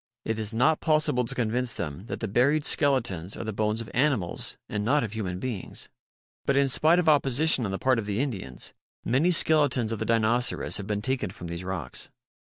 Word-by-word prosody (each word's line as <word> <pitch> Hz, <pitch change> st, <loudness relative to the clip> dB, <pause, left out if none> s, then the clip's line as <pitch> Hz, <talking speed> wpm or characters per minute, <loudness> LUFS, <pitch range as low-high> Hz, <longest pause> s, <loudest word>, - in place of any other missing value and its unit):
It 110 Hz, 0 st, -2 dB
is 110 Hz, -1 st, -2 dB
not 125 Hz, +8 st, +3 dB
possible 155 Hz, -5 st, +2 dB
to -, -, -4 dB
convince 120 Hz, +1 st, -1 dB
them 75 Hz, +8 st, -5 dB
that -, -, -5 dB
the 110 Hz, -, -1 dB
buried 140 Hz, +8 st, +2 dB
skeletons 115 Hz, -, +1 dB
are -, -, -4 dB
the 110 Hz, -1 st, -4 dB
bones 105 Hz, +2 st, 0 dB
of 115 Hz, -, -8 dB
animals 125 Hz, -, 0 dB
and 105 Hz, -1 st, -3 dB
not 140 Hz, +5 st, +2 dB
of 110 Hz, -2 st, -4 dB
human 95 Hz, -5 st, -3 dB
beings. 110 Hz, -1 st, -5 dB, 0.5 s
But 140 Hz, -, +1 dB
in 140 Hz, -1 st, +3 dB
spite 160 Hz, +6 st, +4 dB
of 180 Hz, -2 st, +1 dB
opposition 145 Hz, -2 st, +3 dB
on 100 Hz, -, -2 dB
the 95 Hz, -, -2 dB
part 130 Hz, 0 st, +2 dB
of 105 Hz, -, -5 dB
the 105 Hz, +1 st, -1 dB
Indians, 95 Hz, -, -4 dB, 0.3 s
many 135 Hz, +9 st, +2 dB
skeletons 145 Hz, -9 st, +3 dB
of 115 Hz, -, -3 dB
the -, -, -2 dB
Dinoceras 115 Hz, +2 st, +1 dB
have 100 Hz, -, -6 dB
been 105 Hz, -1 st, -2 dB
taken 130 Hz, -5 st, -1 dB
from 90 Hz, -2 st, -9 dB
these 85 Hz, +1 st, -5 dB
rocks. 90 Hz, -8 st, -4 dB
115 Hz, 205 wpm, -27 LUFS, 105-140 Hz, 0.5 s, spite